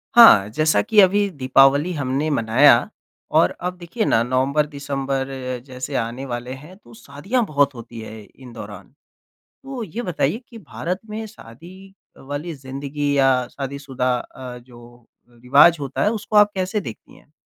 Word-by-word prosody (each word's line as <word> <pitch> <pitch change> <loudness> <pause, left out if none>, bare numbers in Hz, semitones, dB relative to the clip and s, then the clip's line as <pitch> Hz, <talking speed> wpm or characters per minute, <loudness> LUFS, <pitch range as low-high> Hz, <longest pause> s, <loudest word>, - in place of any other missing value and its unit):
हाँ, 105 - +8
जैसा 155 -2 +2
की 210 - +2
अभी 200 +2 +3
दीपावली 140 +1 +3
हमने 140 +1 -2
मनाया 120 0 +5 0.6
और - - +4
अब 180 0 -4
देखिए 180 +6 -3
ना 115 - +3
नवम्बर, 130 +4 +1
दिसम्बर 140 -2 -3 0.4
जैसे 130 +1 -7
आने 120 +2 -3
वाले 120 -1 -5
हैं 165 +5 -13
तो 120 - -19
शादियाँ 145 - -3
बहुत 145 -5 +1
होती 115 -1 -10
है 110 0 -9
इन 125 +3 -15
दौरान। 100 -4 -10 0.8
तो 270 -3 -6
ये 220 +4 -5
बताइए 175 - -1
की 230 - -12
भारत 180 0 -5
में 220 +1 -5
शादी 190 - -14 0.2
वाली 145 +5 -6
ज़िंदगी 140 +1 -4
या 130 -2 +3
शादीशुदा 135 -2 -3
अ, 125 0 -9
जो 120 -1 -17 0.2
रिवाज़ 125 +8 +4
होता 140 -2 -3
है 210 - +3
उसको 215 -1 -3
आप 210 0 +6
कैसे 190 +2 -2
देखती - - -10
हैं? - - -23
140 Hz, 155 wpm, -21 LUFS, 125-180 Hz, 0.8 s, हाँ